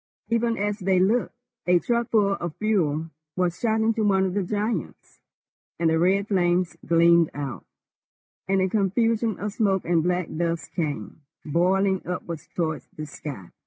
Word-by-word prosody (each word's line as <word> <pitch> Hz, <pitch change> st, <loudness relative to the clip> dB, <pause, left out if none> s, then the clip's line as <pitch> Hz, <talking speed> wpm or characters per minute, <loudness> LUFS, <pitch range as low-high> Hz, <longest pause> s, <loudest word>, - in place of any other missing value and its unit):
Even 230 Hz, 0 st, +1 dB
as 205 Hz, +1 st, -1 dB
they 190 Hz, -1 st, +2 dB
looked, 215 Hz, +7 st, +1 dB, 0.3 s
a 180 Hz, 0 st, +5 dB
truckful 225 Hz, 0 st, +1 dB
of 175 Hz, -5 st, -4 dB
fuel 165 Hz, -7 st, 0 dB, 0.2 s
was 180 Hz, -2 st, 0 dB
shot 220 Hz, -1 st, +1 dB
into 225 Hz, 0 st, +1 dB
one 190 Hz, -2 st, +3 dB
of 185 Hz, -, -2 dB
the 200 Hz, -, 0 dB
giants, 205 Hz, -1 st, -3 dB, 0.6 s
and 165 Hz, -1 st, +2 dB
the 160 Hz, -, +2 dB
red 195 Hz, +4 st, +2 dB
flames 180 Hz, -3 st, +1 dB
gleamed 170 Hz, -1 st, +4 dB
out, 140 Hz, -5 st, -5 dB, 0.8 s
and 195 Hz, 0 st, +2 dB
a 185 Hz, -, +2 dB
confusion 220 Hz, +2 st, +1 dB
of 205 Hz, +1 st, -3 dB
smoke 195 Hz, -4 st, +1 dB
and 170 Hz, -1 st, +2 dB
black 180 Hz, 0 st, 0 dB
dust 165 Hz, -2 st, -2 dB
came 150 Hz, -, -4 dB, 0.2 s
boiling 190 Hz, +4 st, +2 dB
upwards 170 Hz, -3 st, -5 dB
towards 160 Hz, -3 st, -2 dB
the 155 Hz, -, -4 dB
sky. 140 Hz, -, -8 dB
185 Hz, 155 wpm, -25 LUFS, 165-205 Hz, 0.8 s, a